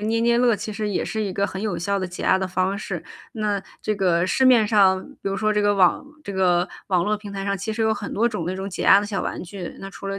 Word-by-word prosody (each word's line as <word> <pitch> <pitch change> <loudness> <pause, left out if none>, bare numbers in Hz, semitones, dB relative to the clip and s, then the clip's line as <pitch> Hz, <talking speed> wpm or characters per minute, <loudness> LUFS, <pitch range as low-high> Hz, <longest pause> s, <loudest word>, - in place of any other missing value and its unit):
捏 220 +2 0
捏 235 0 +3
乐， 240 -3 +3
其 215 +2 -5
实 210 +1 -3
也 200 - -1
是 220 0 -3
一 195 -2 -3
个 200 +2 0
很 190 - -6
有 215 - -1
效 200 +3 -1
的 185 - -2
减 180 - -7
压 190 - +4
的 190 -1 -2
方 185 +2 0
式， 200 - -5 0.3
那 210 -4 -1 0.2
这 215 - 0
个 180 -3 +2
市 260 +8 +2
面 245 -4 +6
上 195 -3 +4 0.2
比 - - -2
如 195 - -2
说 215 +1 +1
这 210 - +1
个 205 0 +3
网 185 +6 +3 0.2
这 200 - -5
个 180 -1 +2 0.2
网 180 -2 +2
络 215 0 +1
平 205 -1 -10
台 195 -1 -4
上 200 0 0
其 200 +3 -4
实 225 - -2
有 220 0 +3
很 205 -1 -6
多 230 +3 +2
种 210 -7 -4
那 185 +1 -2
种 195 +1 -4
解 185 - -5
压 195 - +7
的 205 - -2
小 205 -2 -2
玩 - - -4
具， 180 -1 -8
那 195 - -7
除 195 - -9
了 195 0 -3
200 Hz, 320 characters per minute, -23 LUFS, 190-215 Hz, 0.3 s, 压